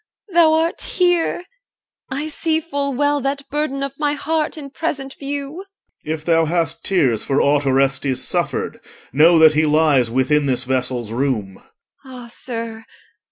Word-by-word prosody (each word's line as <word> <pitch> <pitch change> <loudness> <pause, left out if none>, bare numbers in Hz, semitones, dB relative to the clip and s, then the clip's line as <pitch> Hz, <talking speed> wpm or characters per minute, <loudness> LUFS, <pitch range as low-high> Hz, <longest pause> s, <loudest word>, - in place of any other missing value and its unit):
thou 330 -2 +5
art 325 +1 0
here: 355 -1 +1 0.7
I 280 +4 -3
see 315 +1 -1
full 285 -3 -3
well 290 +2 +1
That 275 +1 -3
burden 290 -2 -2
of 275 0 -6
my 295 -1 +1
heart 310 +2 -2
in 280 -3 -8
present 275 -4 -4
view. 280 +2 -5
OR. 390 - -9 0.4
If 155 0 -4
thou 165 -1 +3
hast 165 0 -1
tears 135 - +1
for 140 0 0
aught 145 0 +2
Orestes 135 0 +1
suffered, - - -2 0.3
Know 165 +5 +6
that 160 -1 +7
he 155 +1 +2
lies 150 -5 +3
within 140 +4 +1
this 130 -1 +2
vessel's 125 -3 -2
room. 115 -7 -2 0.5
EL. 260 -1 -11
Ah, 245 -1 -9
sir! 230 -2 -6
225 Hz, 160 wpm, -19 LUFS, -, 0.7 s, that